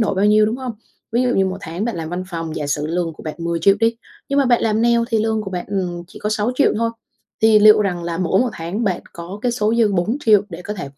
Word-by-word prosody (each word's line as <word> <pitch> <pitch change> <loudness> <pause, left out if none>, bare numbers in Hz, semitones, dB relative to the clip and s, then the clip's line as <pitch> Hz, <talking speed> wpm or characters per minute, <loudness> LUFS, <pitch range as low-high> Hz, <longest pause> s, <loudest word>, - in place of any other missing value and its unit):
đổi 220 - +1
bao 195 +2 +1
nhiêu, 210 0 +5
đúng 225 - -1
hông? 255 -2 -5 0.4
Ví 240 +2 +2
dụ 250 - +1
như 190 0 +3
một 190 +1 -4
tháng 170 +5 -4
bạn 235 -7 -2
làm 160 -1 -4
văn 180 +2 -4
phòng, 165 -3 -5
giả 150 - -3
sử 145 +1 -1
lương 170 0 -2
của - - -13
bạn 155 - -5
10.000.000 170 +3 +2
đi, 230 0 +2 0.3
nhưng 280 - +1
mà 280 - +4
bạn 245 -2 +3
làm 220 0 +1
nail 235 0 +4
thì 225 - +2
lương 220 0 0
của 195 - -6
bạn, 180 -1 -4
ừm, 180 -3 -3
chỉ - - -12
có 210 - -2
6.000.000 225 +6 +1
thôi, 230 +1 0 0.5
thì 220 -1 +6
liệu 215 +1 +7
rằng 180 -3 -2
là 170 -1 -3
mỗi 185 +2 +2
một 250 -1 +1
tháng 185 +6 -4
bạn 185 -3 0
có 170 +4 -8
cái 245 - +1
số 220 -1 0
dư 225 -3 +3
4.000.000 215 +3 +2
để 175 0 -8
có 210 - -5
thể 145 -8 -6
205 Hz, 280 wpm, -20 LUFS, 175-225 Hz, 0.5 s, liệu